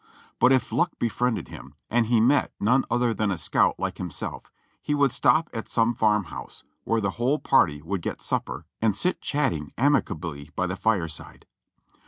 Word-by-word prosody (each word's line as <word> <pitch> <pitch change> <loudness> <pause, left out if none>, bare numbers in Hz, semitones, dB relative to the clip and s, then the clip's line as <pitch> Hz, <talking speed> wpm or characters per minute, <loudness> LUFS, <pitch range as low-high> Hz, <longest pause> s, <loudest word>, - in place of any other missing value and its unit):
But 125 - +5
if 130 -3 +2
luck 135 +10 +1
befriended 120 +1 -1
him, 70 - -11
and 115 0 +1
he 120 -1 +3
met 130 +6 +3
none 125 +6 +3
other 120 -1 +1
than 105 0 0
a 95 - -1
scout 80 - +2
like - - -3
himself, - - -5 0.3
he 150 - -1
would 140 -3 +3
stop 160 +6 +3
at 115 -1 -5
some 115 0 +2
farm 105 -2 +2
house, 80 - -10 0.2
where 115 0 +1
the 100 -1 0
whole 135 +5 +2
party 75 - +2
would 95 +2 -3
get - - -4
supper - - -3 0.2
and 110 -3 +2
sit 180 - 0
chatting 130 - -1
ami 140 0 +4
cably 75 -5 -7
by 90 - 0
the 95 +1 -3
fireside. 90 -8 -2
115 Hz, 185 wpm, -25 LUFS, 95-125 Hz, 0.3 s, But